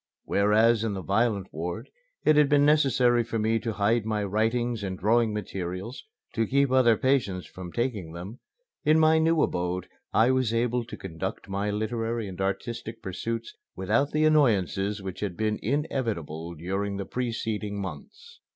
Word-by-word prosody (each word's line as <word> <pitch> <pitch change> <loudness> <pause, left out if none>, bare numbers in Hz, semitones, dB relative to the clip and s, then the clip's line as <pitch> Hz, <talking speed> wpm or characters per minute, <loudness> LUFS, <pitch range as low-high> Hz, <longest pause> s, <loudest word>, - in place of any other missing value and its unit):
Whereas 110 +3 +3
in 110 -3 -1
the 95 - -5
violent 100 -2 0
ward 85 +2 -5 0.3
it 155 - +6
had 150 -1 +5
been 145 -1 +5
necessary 130 -5 +4
for 115 0 -3
me 110 +1 +1
to 115 0 -3
hide 110 +3 +2
my 105 -1 -1
writing 115 +4 0
and 95 -2 -4
drawing 115 +3 +2
materials 95 +2 -5 0.3
to 115 -1 0
keep 140 0 +2
other 120 -4 +5
patients 115 -9 +1
from 90 -1 -9
taking 110 -8 -2
them, 95 +9 -8 0.4
in 155 +1 +4
my 160 0 +5
new 160 0 +3
abode 90 0 -2 0.2
I 115 +4 +4
was 130 -3 +1
able 120 +1 0
to - - -8
conduct 85 +1 -5
my 100 +2 -1
literary 115 +1 -2
and 95 0 -7
artistic 115 +4 -3
pursuits 115 +5 -4 0.2
without 110 +9 +1
the 155 +1 +2
annoyances 105 - +2
which 95 -1 -6
had 100 -4 -3
been 110 -1 0
inevitable 105 - -2
during 95 +5 -3
the 100 - -4
preceding 110 -3 -3
months. 155 - -8
110 Hz, 160 wpm, -27 LUFS, 95-120 Hz, 0.4 s, it